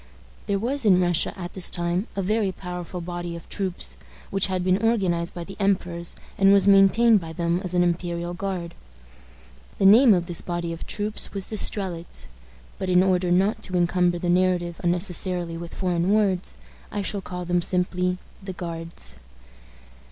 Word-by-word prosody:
There 200 - +1
was 255 +7 -1
in 190 -4 +5
Russia 175 -2 +2
at 175 0 -6
this 190 - 0
time 175 +4 -1
a 195 - -1
very 210 0 +1
powerful 180 -1 -6
body 175 0 -5
of 170 - -10
troops, 190 -3 -4 0.3
which 195 -1 +2
had 185 -1 -1
been 185 +2 +2
organized 185 -7 +1
by 175 - -5
the 195 +3 -9
emperors, 180 -4 -1 0.2
and 195 0 +6
was 200 -1 +5
maintained 200 +3 +6
by 165 -1 -7
them 170 +1 0
as 180 -1 -1
an 175 - +4
imperial 175 0 -2
guard. 175 -2 -4 1.0
The 195 - +1
name 220 +2 +8
of 175 -1 -1
this 170 -1 -3
body 175 -1 -3
of 165 - -8
troops 210 0 -2
was 195 -2 -1
the 220 - -6
Strelitz; 185 -5 -1 0.5
but, 190 -1 -2
in 180 0 +5
order 185 -1 +2
not 190 +4 +2
to 185 - -5
encumber 175 0 +2
the 175 - -3
narrative 175 -1 +1
unnecessarily 175 -1 0
with 170 0 -8
foreign 180 -1 0
words, 200 -4 +1 0.3
I 205 -1 -2
shall 200 +1 -3
call 180 -1 -6
them 175 0 +1
simply 180 0 0 0.2
the 190 -1 -6
Guards. 165 -1 -5
180 Hz, 175 wpm, -24 LUFS, 175-195 Hz, 1.0 s, name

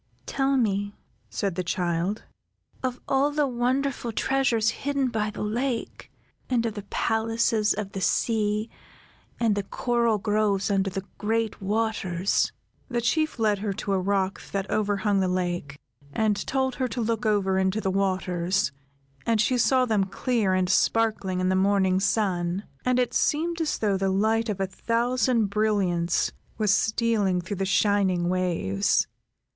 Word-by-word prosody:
"Tell 270 0 +1
me," 205 -4 0 0.3
said 195 - -2
the 185 - -2
child, 175 +3 -1 0.6
"of 255 -1 -2
all 275 +2 +3
the 295 0 +1
wonderful 255 0 -1
treasures 235 -2 +1
hidden 275 +2 -1
by 215 -2 -1
the 210 - -5
lake, 235 +3 -3 0.4
and 240 -2 +1
of 225 - -1
the 205 - -6
palaces 225 -1 +1
of 200 -1 -4
the 195 - -5
sea, 215 0 +1 0.7
and 230 -3 +3
the 205 - 0
coral 235 +2 0
groves 205 -1 +1
under 195 -1 +1
the 195 +1 -5
great 225 0 -1
waters!" 200 -3 0 0.4
The 240 -2 0
Chief 310 +6 0
led 215 -3 +1
her 205 -1 -2
to 195 +1 -3
a 190 - +2
rock 195 0 0
that 195 0 -2
overhung 205 -1 +1
the 190 - +1
lake, 175 -5 -2 0.3
and 210 +4 0
told 265 -1 0
her 255 - +2
to 245 - -5
look 225 0 -1
over 195 -3 +2
into 190 +2 +1
the 190 -3 -1
waters, 185 -3 0 0.6
and 230 -2 +2
she 235 +4 +2
saw 255 +2 +4
them 215 -5 +1
clear 200 0 0
and 185 -1 +1
sparkling 205 -1 +1
in 185 0 +1
the 185 - +2
morning 190 -1 +3
sun, 190 -3 0 0.2
and 250 0 +2
it 250 -1 +1
seemed 330 +3 +1
as 310 -2 0
though 205 -3 +1
the 195 0 0
light 220 +4 +1
of 200 -2 -2
a 195 - +1
thousand 235 +2 0
brilliants 195 -5 +1 0.3
was 210 -2 +3
stealing 220 -5 +1
through 185 +3 -5
the 195 - -1
shining 190 -3 +2
waves. 170 - +1
210 Hz, 155 wpm, -26 LUFS, 190-230 Hz, 0.7 s, saw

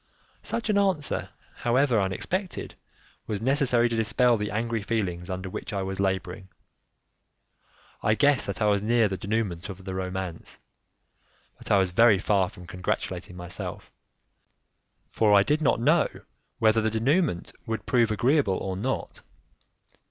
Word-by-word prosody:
Such 230 - -3
an 200 - +3
answer, 185 -8 0 0.3
however, 120 -2 +2
unexpected, 180 - -3 0.5
was 105 -2 -2
necessary 125 -1 +2
to 115 - -2
dispel 115 +2 +3
the 105 -1 -2
angry 115 +2 -2
feelings 95 -5 -2
under 95 0 -4
which 95 - -6
I 100 -1 -1
was 95 0 -4
labouring. 95 -1 -2 1.5
I 110 - +2
guessed 145 +2 +3
that 100 +2 -2
I - - +3
was 100 -1 +3
near 115 +1 +3
the 95 - -3
denouement 100 -1 -2
of 95 -1 -9
the 95 - -4
romance, 95 -2 -5 1.0
but - - -10
I 100 - +5
was 95 -2 +2
very 115 +2 +5
far 95 -1 +1
from 90 - -13
congratulating 90 0 -4
myself, 90 0 -5 1.2
for 105 -2 +4
I 100 - +6
did 150 +7 +1
not 140 - +2
know 150 +7 +3 0.5
whether 110 0 +3
the 110 - +1
denouement 120 - 0 0.2
would 110 0 -3
prove 120 -3 +3
agreeable 120 -1 +2
or 95 -1 -3
not. 95 - -3
105 Hz, 145 wpm, -26 LUFS, 95-120 Hz, 1.5 s, I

